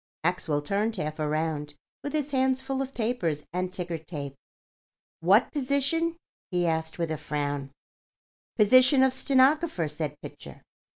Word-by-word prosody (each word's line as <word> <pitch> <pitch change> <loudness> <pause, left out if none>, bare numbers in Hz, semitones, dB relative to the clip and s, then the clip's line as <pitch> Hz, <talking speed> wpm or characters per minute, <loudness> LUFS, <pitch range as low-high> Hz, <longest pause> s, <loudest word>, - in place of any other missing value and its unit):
Maxwell 160 -4 0
turned 210 +7 0
half 155 -4 -4
around, 150 -1 -1 0.3
with 285 - -4
his 295 -2 -1
hands 265 -1 +2
full 265 0 -3
of 270 0 -5
papers 200 -11 -1
and 180 0 -1
ticker 175 -3 -4
tape. 150 -4 -6 0.9
"What 195 +8 +4
position?" 290 +4 +1 0.3
he 180 -2 0
asked, 160 -1 -1
with 165 -2 -1
a 155 - -1
frown. 145 -2 -3 0.9
"Position 255 +5 +6
of 265 -1 +3
stenographer," 270 - +3
said 150 -1 -4
Pitcher. - - -11
185 Hz, 135 wpm, -27 LUFS, -, 0.9 s, Position